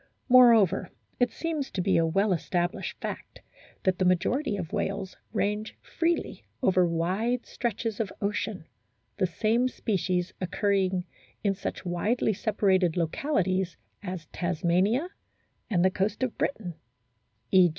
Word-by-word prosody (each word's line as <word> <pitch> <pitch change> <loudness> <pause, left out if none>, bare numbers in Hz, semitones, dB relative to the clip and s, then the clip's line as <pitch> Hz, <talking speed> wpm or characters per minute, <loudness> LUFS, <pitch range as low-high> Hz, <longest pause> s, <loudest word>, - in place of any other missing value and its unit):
Moreover, 235 -7 +6 0.3
it 245 -2 +3
seems 310 -5 -3
to - - -5
be 190 +1 +2
a 165 0 +3
well 195 +4 +2
established 175 +1 -2
fact - - -6 0.4
that 185 -1 +1
the - - +3
majority 205 - +1
of 175 -5 -5
whales 195 -1 -2 0.2
range 210 0 -1
freely 335 0 -1 0.2
over 185 -5 +4
wide 190 +9 0
stretches 225 -2 -3
of 215 -4 -1
ocean, 200 -3 -2 0.5
the 185 - +2
same 225 +7 +1
species 185 -7 -1
occurring 190 -1 +1 0.4
in 200 -2 +2
such 190 - -5
widely 210 +6 +1
separated 190 -4 +2
localities 185 - 0 0.2
as 185 -4 -5
Tasmania 180 - +1 0.6
and 185 -4 +3
the 190 - +4
coast 200 +6 -1
of 255 - -1
Britain 190 -10 -2 0.8
(e. 185 -2 +7
195 Hz, 130 wpm, -28 LUFS, 180-225 Hz, 0.8 s, e